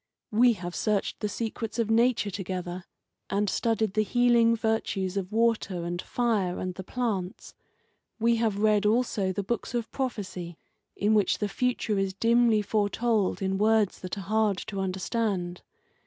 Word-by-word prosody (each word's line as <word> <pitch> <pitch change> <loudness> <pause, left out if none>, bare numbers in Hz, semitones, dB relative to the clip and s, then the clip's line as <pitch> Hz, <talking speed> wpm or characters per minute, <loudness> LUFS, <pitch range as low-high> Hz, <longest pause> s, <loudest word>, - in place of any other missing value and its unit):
We 235 +3 +5
have 175 -3 -6
searched 210 -2 -1
the 210 - -2
secrets 225 0 -4
of 225 -2 0
Nature 230 -2 +3
together, 180 -1 -5 0.4
and 205 +1 0
studied 220 -1 0
the 215 - +2
healing 235 +1 +4
virtues 215 -4 -1
of 195 -1 -3
water 220 -5 +1
and 175 +1 -3
fire 215 -7 0
and 185 0 -3
the 190 - -7
plants. 200 -5 -3 0.7
We 230 +1 +3
have 225 -3 0
read 210 0 +3
also 215 -4 +1
the 200 +2 -3
books 235 +3 -3
of 235 -2 -2
prophecy 185 - -4 0.4
in 210 +2 +2
which 210 -2 +3
the 210 - -1
future 215 -1 -1
is 195 -1 -1
dimly 230 0 +3
foretold 210 0 0
in 190 0 0
words 215 -2 +2
that 185 +2 -5
are - - -4
hard 210 0 +1
to 200 -2 -5
understand. 190 -1 -2
210 Hz, 155 wpm, -27 LUFS, 190-230 Hz, 0.7 s, We